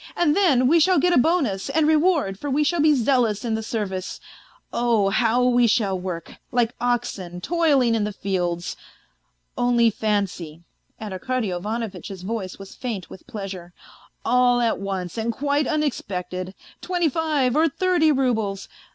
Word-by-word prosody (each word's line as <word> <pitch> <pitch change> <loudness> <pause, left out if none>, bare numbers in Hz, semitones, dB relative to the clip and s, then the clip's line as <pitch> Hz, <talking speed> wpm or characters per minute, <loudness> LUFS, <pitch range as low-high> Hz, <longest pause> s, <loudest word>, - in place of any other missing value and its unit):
And 320 -3 +2
then 280 -11 +4
we 335 +5 +5
shall 370 +3 +4
get 355 0 +3
a - - +4
bonus 260 - +1
and 300 +2 +2
reward, 310 - +2
for 290 - -4
we 285 +3 +2
shall 340 +3 0
be 300 0 +5
zealous 240 -4 +1
in 230 - -1
the 220 - -1
service 205 -4 -4 0.5
oh! 230 -4 +2
how 240 +3 +2
we 245 -1 +4
shall 210 -4 +1
work, 180 -2 -6
like 240 -1 +1
oxen 235 -8 -2
toiling 285 - +2
in 225 -2 +1
the 210 - -2
fields.... 180 -3 -2 0.8
Only 240 -2 +3
fancy," 195 -7 -2 0.4
and 215 -3 -6
Arkady 230 +2 -2
Ivanovitch's 205 0 -5
voice 195 -2 -4
was 195 -1 -11
faint 220 -8 -5
with - - -12
pleasure, 190 -4 -7 0.5
"all 245 0 +3
at 235 -2 +1
once 190 -1 -4
and 225 +1 -1
quite 285 +3 0
unexpected, 190 - -3 0.3
twenty 355 -2 0
five 295 -4 0
or 320 +2 +4
thirty 350 0 +2
roubles... 225 -8 0
235 Hz, 155 wpm, -23 LUFS, 195-285 Hz, 0.8 s, we